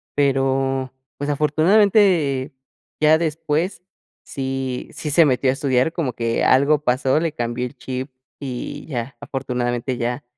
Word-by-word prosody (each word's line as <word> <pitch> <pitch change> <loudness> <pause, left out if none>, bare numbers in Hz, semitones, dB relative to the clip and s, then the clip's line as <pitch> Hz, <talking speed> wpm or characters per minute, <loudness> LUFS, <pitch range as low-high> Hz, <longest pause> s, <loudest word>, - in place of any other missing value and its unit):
Pero, 135 -1 +1 0.2
pues, 145 +1 -3
afortunadamente, 155 -2 +3 0.5
ya 155 +1 +6
después, 165 +2 -1 0.4
sí 135 -1 -4
sí 150 - -5
se 165 +2 +6
metió 130 -1 +2
a - - +3
estudiar, 135 +1 +1
como 150 -8 -2
que 115 0 -1
algo 140 +3 +4
pasó, 130 +2 +2
le 165 0 -1
cambió 120 -1 -2
el 125 +3 -8
chip, 130 +2 -5 0.3
y 130 -4 -6
ya 125 -2 -5
afortunadamente 125 -1 -2
ya 120 +3 -2
135 Hz, 135 wpm, -21 LUFS, 130-150 Hz, 0.5 s, ya